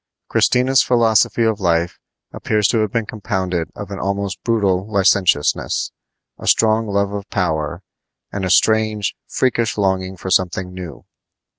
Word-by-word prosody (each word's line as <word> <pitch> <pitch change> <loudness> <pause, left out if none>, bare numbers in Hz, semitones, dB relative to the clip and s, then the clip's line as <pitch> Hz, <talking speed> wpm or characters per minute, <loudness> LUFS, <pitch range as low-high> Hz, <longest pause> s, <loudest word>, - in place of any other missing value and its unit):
Christina's 130 +1 +3
philosophy 115 -1 +2
of 110 -2 +1
life 85 -2 0 0.3
appears 105 -2 0
to 115 - +1
have 110 -2 0
been 115 -1 -1
compounded 95 -6 -3
of 100 -1 -8
an 100 - -5
almost 100 0 -3
brutal 100 -3 0
licentiousness, 95 -6 +1 0.5
a - - -8
strong 110 0 +3
love 100 0 0
of 100 0 -6
power, 85 -3 -2 0.5
and 100 - -4
a 95 - -1
strange, 110 +2 +2
freakish 115 -4 0
longing 95 -2 -1
for 95 +1 -6
something 90 0 0
new. 85 -8 -9
100 Hz, 140 wpm, -19 LUFS, 95-110 Hz, 0.5 s, Christina's